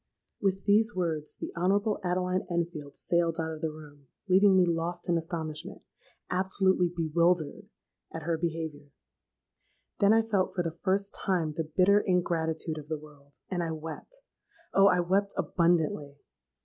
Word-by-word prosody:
"With 195 -1 0
these 220 +2 +3
words 160 -4 -2
the - - -6
honourable 200 +5 +1
Adeline 180 +1 0
Enfield 170 -4 -3
sailed 170 -1 0
out 160 0 -2
of 155 - -8
the 160 - 0
room, 145 -2 -13 0.2
leaving 190 +1 +5
me 185 - +5
lost 170 +1 -2
in 175 - +2
astonishment—absolutely 175 +3 -2
bewildered—at 170 -1 -2
her 165 +1 0
behaviour. 160 -4 -4 1.1
Then 200 +1 +5
I 225 0 +5
felt 205 -4 0
for 175 - 0
the 165 - -2
first 195 +4 -1
time 170 -5 -1
the 160 -1 -4
bitter 200 +2 +6
ingratitude 165 -4 0
of 145 - -11
the 155 0 -2
world, 145 -2 -17 0.2
and 180 -2 0
I 170 - -2
wept. 160 - -8 0.5
Oh! 195 0 +6
I 180 -2 +4
wept 195 +3 0
abundantly. 160 -5 +1
170 Hz, 145 wpm, -29 LUFS, 160-190 Hz, 1.1 s, bitter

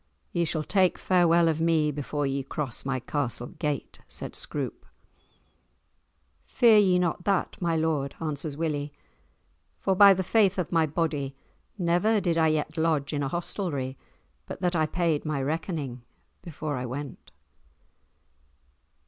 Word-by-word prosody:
Ye 170 -1 +1
shall 155 -1 -1
take 185 +1 +2
farewell 170 -2 +4
of 160 0 0
me 160 -2 +2
before 145 0 -3
ye 135 0 -1
cross 135 -2 -4
my 135 -1 -1
castle 125 -3 -3
gate," 150 -1 -3
said - - -7
Scroope. - - -5 1.6
"Fear 230 -4 +5
ye 185 -3 +4
not 175 -1 0
that, 195 -2 0
my 170 -2 +1
lord," 155 -4 0
answers 150 -2 -4
Willie, 150 -3 -2 0.9
"for 190 - 0
by 200 0 +8
the 190 - -1
faith 200 0 +3
of 180 -4 -2
my 165 -2 +3
body, 145 -3 -2 0.4
never 180 +5 +2
did 175 -4 0
I 160 -1 +3
yet 155 +1 -1
lodge 160 -3 +1
in 145 - -1
a 140 - 0
hostelry 150 -5 -3 0.5
but - - -7
that 180 -1 +1
I 155 -1 +2
paid 165 -2 0
my 150 -2 -2
reckoning 145 -3 -3 0.4
before 155 -4 -5
I 125 - -3
went." 135 +2 -7
160 Hz, 145 wpm, -27 LUFS, 145-175 Hz, 1.6 s, by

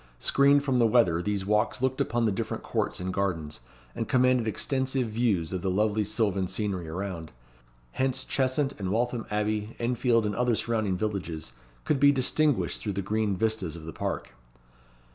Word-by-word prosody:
Screened 140 - +4
from 135 -3 +1
the 115 - +5
weather, 100 -8 +3
these 100 0 -2
walks 105 +4 +1
looked 130 +1 0
upon 120 -1 +1
the 110 - +2
different 95 - -3
courts - - -2
and 90 0 -3
gardens, 85 -6 -2 0.3
and - - -3
commanded 125 -2 +3
extensive 130 +2 0
views 105 -7 0
of 90 - -2
the 95 - -1
lovely 105 +2 +1
sylvan 100 -3 0
scenery 95 -3 -3
around. 85 -2 -5 0.6
Hence 130 - 0
Cheshunt 135 +1 0
and 95 -2 -2
Waltham 120 +2 -1
Abbey, 105 +1 -1
Enfield, 120 -1 +1
and 105 -1 -1
other 125 -2 +2
surrounding 110 -5 0
villages, 90 -6 -3 0.3
could 150 - +1
be 140 +1 +7
distinguished 145 +1 +1
through 105 - -3
the 100 +1 -3
green 105 0 0
vistas 110 -6 -1
of 80 -2 -9
the 80 - -7
park. - - -4
110 Hz, 170 wpm, -27 LUFS, 95-125 Hz, 0.6 s, be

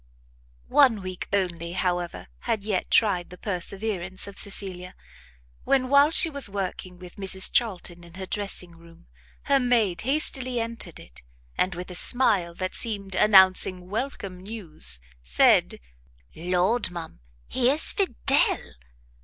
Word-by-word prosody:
One 245 -9 +4
week 185 -1 -7
only, 175 -4 -2
however, 175 -2 -3 0.2
had 210 -3 -1
yet 205 -3 -3
tried 185 -6 +1
the 180 - -12
perseverance 190 -1 -4
of 200 - -11
Cecilia, 185 -2 -5 0.7
when, 255 -2 0
while 280 +2 +5
she 330 - +5
was 280 -8 -1
working 185 -2 -6
with 180 -1 -14
Mrs 190 -1 +5
Charlton 180 -6 -1
in 170 0 -15
her 190 0 -7
dressing 185 -3 -3
room, 165 0 -19 0.4
her 275 -1 +2
maid 225 -9 +1
hastily 255 -2 0
entered 230 -7 -5
it, - - -16 0.3
and 185 -1 -1
with 180 +1 -8
a - - -7
smile 190 -4 +5
that 185 +1 -5
seemed 200 -4 -1
announcing 185 -2 +3
welcome 205 -6 -5
news, 175 - -2 0.3
said, - - +2 0.5
"Lord, 180 +8 0
ma'am, 170 - -9 0.3
here's 260 +5 +4
Fidel!" 370 - 0
190 Hz, 130 wpm, -24 LUFS, 180-225 Hz, 0.7 s, while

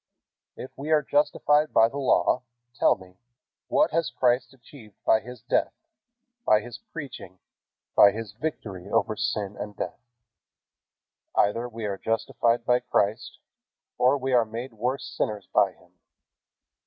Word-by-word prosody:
If 130 - -8
we 145 +3 -6
are 155 -1 +4
justified 150 +1 +2
by 110 - +7
the 140 +5 -6
Law, 130 -1 +2 0.3
tell - - +3
me, 95 -1 -17 0.5
what - - +3
has 165 0 0
Christ 125 -1 +1
achieved 120 -4 -16
by 110 - +5
His 125 0 -11
death, - - 0 0.7
by 105 - +5
His 120 +2 -9
preaching, 130 - -8 0.6
by 100 - +8
His 110 0 -6
victory 105 - -5
over 110 - +1
sin 105 -1 -2
and 105 -1 -6
death? - - -5 1.3
Either 115 +4 +2
we 115 -2 -6
are 100 -2 -3
justified 115 +1 0
by 125 0 +3
Christ, 105 -2 -1 0.6
or 130 +3 +4
we 135 -1 -2
are 120 -2 +5
made 115 +3 -7
worse 125 +5 -2
sinners 105 -3 -3
by 95 -2 +4
Him." 90 +1 -25
115 Hz, 140 wpm, -26 LUFS, 105-130 Hz, 1.3 s, by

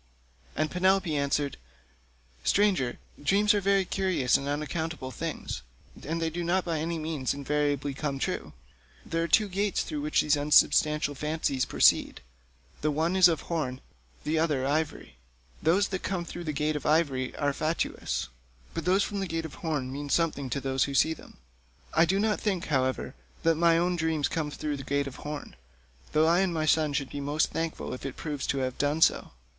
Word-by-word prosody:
And 155 0 0
Penelope 185 -2 +2
answered, 140 0 0 0.9
"Stranger, 190 -12 +2 0.3
dreams 205 +6 +4
are 205 - +1
very 195 0 +3
curious 185 -10 +1
and 140 - 0
unaccountable 150 -1 -3
things, 65 - -5 0.4
and 165 +3 -2
they 165 -1 -1
do 175 +2 -3
not 180 +2 +1
by 165 -3 -1
any 165 +2 -2
means 155 -5 -2
invariably 145 0 -1
come 140 0 -3
true. - - -3 0.5
There 165 - -1
are 170 - 0
two 215 +4 +4
gates 200 +1 0
through 150 -2 -4
which 150 +1 +2
these 150 0 +3
unsubstantial 150 0 +4
fancies 150 -2 -1
proceed; - - +3 0.6
the 155 - +1
one 160 +5 0
is 185 -1 +8
of 160 -5 0
horn, 155 -7 -2
and - - -23 0.4
the 155 +1 0
other 150 -5 +1
ivory. 150 - -2 0.4
Those 185 +6 +3
that 190 -2 -3
come 180 -3 -2
through 175 0 -7
the 155 - -1
gate 150 +1 -1
of 150 - -3
ivory 145 -5 +1
are 145 -1 0
fatuous, 155 +4 -2 0.5
but 165 -1 -4
those 190 +2 +3
from 205 - -3
the 195 - -2
gate 165 -1 -3
of 155 - -7
horn 145 -6 -2
mean 145 +1 -5
something 145 -4 +1
to 140 - -1
those 135 -1 +1
that 140 - -4
see 160 - +4
them. - - -15 0.6
I 165 - +5
do 190 +4 +1
not 215 0 +1
think, 195 -5 -1
however, 130 -2 0 0.3
that 165 0 +4
my 165 +1 +4
own 175 +1 +1
dream 160 -2 0
came 155 0 0
through 150 0 -3
the 135 - -7
gate 140 +1 0
of 135 - -7
horn, 150 - -7 0.6
though 155 +1 +4
I 170 +2 +4
and 190 -2 +2
my 160 -2 -1
son 155 -1 +3
should 140 -1 -2
be 145 - -4
most 145 +2 0
thankful 165 0 -3
if 125 - -7
it 135 -2 -5
proves 145 -4 -4
to 140 - 0
have 130 - -5
done 145 +3 +2
so. - - +2
155 Hz, 195 wpm, -28 LUFS, 145-170 Hz, 0.9 s, is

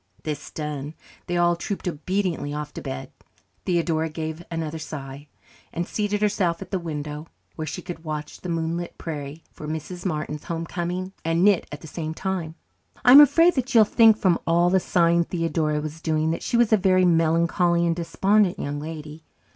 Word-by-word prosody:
This 150 -2 -5
done, 150 -1 -5 0.3
they 175 -1 -1
all 175 0 +3
trooped 190 +2 -5
obediently 175 -2 -2
off 150 0 -5
to - - -7
bed. 65 - -6 0.5
Theodora 165 -3 +1
gave 160 +1 -5
another 165 -1 -4
sigh, 140 -2 -8 0.4
and 170 +1 -3
seated 205 0 -1
herself 190 -5 +1
at 195 - -9
the 190 - 0
window, 150 -2 -5 0.3
where 155 -1 -4
she - - -5
could 175 -3 -7
watch 155 -2 -6
the 180 - -6
moonlit 165 +1 -3
prairie 150 -1 -6
for 150 - -9
Mrs. 160 +3 -5
Martin's 150 -4 -3
homecoming 175 +2 -3
and 165 +2 +1
knit 200 -2 +4
at 145 - -7
the 160 - -10
same 160 0 -5
time. 180 -4 -3 0.5
I 245 - +8
am 280 +3 +12
afraid 330 +5 +6
that 260 -1 -2
you 225 - +9
will - - +6
think 220 0 +5
from 185 -5 +2
all 170 +1 +3
the 190 - +4
sighing 170 -1 +2
Theodora 165 -3 -1
was 155 +2 -6
doing 155 -1 +1
that 165 - -3
she 240 - 0
was 235 -2 +4
a - - +7
very 185 -1 +3
melancholy 170 +1 +3
and 165 -1 +1
despondent 195 +3 +2
young 145 -5 -3
lady. 155 0 -8
170 Hz, 185 wpm, -24 LUFS, 155-185 Hz, 0.5 s, am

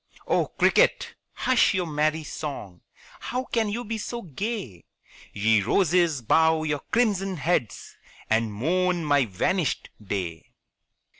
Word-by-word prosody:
Oh, - - +1
cricket, - - +2 0.2
hush 255 -5 +2
your 185 -1 0
merry 155 0 0
song; 120 - -7 0.4
How 250 +1 -3
can 225 -4 -1
you 235 +4 -4
be 225 0 -4
so 235 +3 -5
gay? 190 - -5 0.5
Ye 105 +1 +2
roses 165 - +2
bow 160 +5 +3
your 150 -2 -1
crimson 195 -5 +1
heads, 145 - -2 0.3
And 110 0 +1
mourn 175 - 0
my 145 -3 +3
vanished 135 - -1
day. 90 -5 -5
160 Hz, 125 wpm, -25 LUFS, 115-195 Hz, 0.5 s, bow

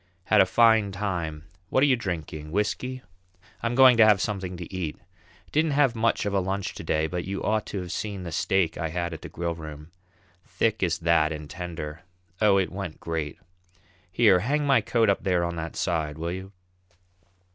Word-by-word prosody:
Had 105 +2 +5
a 95 - +4
fine 110 0 +4
time; 90 -6 -3 0.3
what 130 - +3
are - - +7
you 135 -3 +4
drinking, 80 - -5
whisky? 125 +6 -2 0.6
I'm 115 +1 -1
going 130 -2 +7
to 115 - +8
have 105 -3 +6
something 95 -3 -3
to 90 +1 -8
eat. 85 -5 -3 0.5
Didn't 155 0 +2
have 135 -5 +4
much 115 -1 +1
of 100 - -1
a 100 - +3
lunch 95 +1 -2
to - - -8
day, 80 0 +1
but 90 +2 -3
you 95 +1 -4
ought 110 -1 0
to 100 - -4
have 90 -1 -7
seen 100 -3 -4
the 85 - -6
steak 90 +1 0
I 85 - -1
had 85 +1 -3
at 80 - -8
the - - -8
Grillroom 80 -2 -6 0.5
as - - -30
thick 110 -2 +1
as 85 -3 +1
that, 85 -1 +2
and 75 -1 -6
tender! 85 -2 -6 0.4
Oh, 105 -2 +5
it 95 -2 0
went 95 -4 -6
great! 80 -3 -4 0.7
Here, 95 -2 +5
hang 145 +9 0
my 135 -5 +4
coat 115 +1 +2
up 100 - +2
there 90 -3 +1
on 85 0 -2
that 80 0 -5
side, 80 -4 -1
will 85 +1 -3
you?" 95 +2 -6
95 Hz, 200 wpm, -26 LUFS, 85-105 Hz, 0.7 s, to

